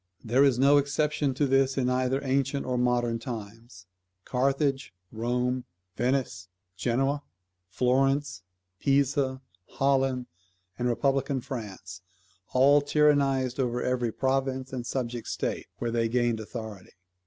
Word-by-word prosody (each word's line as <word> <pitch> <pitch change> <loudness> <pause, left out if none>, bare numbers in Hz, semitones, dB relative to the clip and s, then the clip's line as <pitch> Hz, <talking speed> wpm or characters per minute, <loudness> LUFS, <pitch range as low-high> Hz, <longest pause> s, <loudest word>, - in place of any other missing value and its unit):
There 125 +4 +3
is 135 -4 +4
no 140 +3 +5
exception 145 -1 0
to 145 - +2
this 135 0 +2
in 130 -2 +1
either 130 +1 +1
ancient 135 +1 0
or 125 - -1
modern 120 -1 +1
times. 115 -3 -8 0.4
Carthage, 135 -2 0 0.2
Rome, 125 +2 -1 0.3
Venice, 125 -7 -1 0.3
Genoa, 135 +8 0 0.5
Florence, 135 +3 +1 0.4
Pisa, 135 -1 +1 0.3
Holland, 135 -2 +1 0.5
and 125 - 0
Republican 135 +2 +1
France, 100 -8 -7 0.5
all 140 +3 +5
tyrannized 140 -3 +2
over 125 -1 0
every 125 -2 0
province 130 +1 -1
and 125 -2 -4
subject 120 -2 -3
state - - -3
where 120 -1 -2
they 115 -1 +1
gained 120 -1 +1
authority. 110 -3 -8
130 Hz, 120 wpm, -27 LUFS, 120-135 Hz, 0.5 s, no